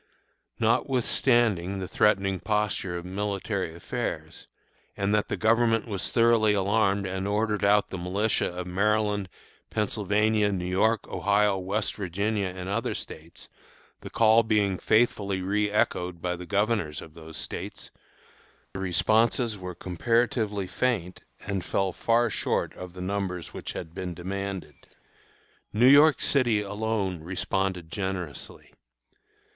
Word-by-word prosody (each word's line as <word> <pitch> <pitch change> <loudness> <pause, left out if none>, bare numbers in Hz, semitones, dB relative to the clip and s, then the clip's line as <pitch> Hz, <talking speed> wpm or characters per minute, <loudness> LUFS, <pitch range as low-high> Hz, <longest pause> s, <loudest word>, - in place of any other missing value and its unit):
Notwithstanding 115 -5 +2
the 95 -1 -4
threatening 100 -2 +2
posture 105 -4 -1
of 85 - -7
military 100 -2 -3
affairs, 85 - -5 0.5
and 100 +1 0
that 105 -1 +2
the - - -3
Government 115 0 +2
was 100 -3 -2
thoroughly 115 -3 +4
alarmed 100 0 +2
and 95 +1 -3
ordered 105 +1 0
out 100 +1 +3
the 95 - -4
militia 100 +5 0
of 90 0 -5
Maryland, 105 +1 +1 0.4
Pennsylvania, 105 0 +1
New 90 -2 -2
York, 100 +4 +1
Ohio, 100 -1 +2
West 100 +3 -1
Virginia, 100 +2 -1
and 90 0 -6
other 105 +4 -1
States, 80 +2 -9 0.5
the - - -9
call 110 0 +5
being 105 -4 +1
faithfully 100 -4 +2
reëchoed 100 -3 0
by 90 +1 -2
the 90 0 -9
Governors 105 -6 0
of 80 - -11
those 80 -1 -10
States, - - -6 0.8
the 95 - -5
responses 110 +5 +2
were 90 -2 -7
comparatively 105 +2 0
faint 95 -2 -1 0.2
and 100 -3 -3
fell 95 -2 -1
far 120 +1 +2
short - - -1
of 90 -1 -9
the 90 - -8
numbers 95 -2 -3
which - - -6
had 80 - -7
been 90 -1 -5
demanded. 95 +2 -5 1.0
New 115 +3 +3
York 145 +3 +7
City 120 -6 +3
alone 105 -3 -2
responded 90 0 -2
generously. 95 -4 -5
100 Hz, 130 wpm, -27 LUFS, 90-110 Hz, 1.0 s, York